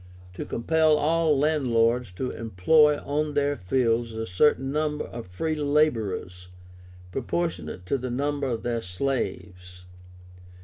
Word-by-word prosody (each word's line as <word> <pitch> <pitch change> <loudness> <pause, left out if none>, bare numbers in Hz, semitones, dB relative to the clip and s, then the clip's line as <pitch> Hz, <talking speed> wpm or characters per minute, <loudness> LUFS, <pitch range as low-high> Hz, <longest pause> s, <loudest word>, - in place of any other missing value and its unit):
To - - -6
compel 155 +5 +2
all 160 0 +2
landlords 125 -6 +2
to 125 +8 -3
employ 145 - +3
on 150 +1 -2
their 145 0 +1
fields 115 +2 0
a 110 0 -4
certain 135 +7 +2
number 150 0 -1
of 115 -4 -8
free 155 - -2
laborers, 115 -12 0 0.6
proportionate 95 - -3
to 135 +9 -1
the 130 +1 -4
number 140 +2 -1
of 115 -3 -3
their 120 -1 -1
slaves. 90 -4 -4
130 Hz, 125 wpm, -26 LUFS, 110-150 Hz, 0.6 s, employ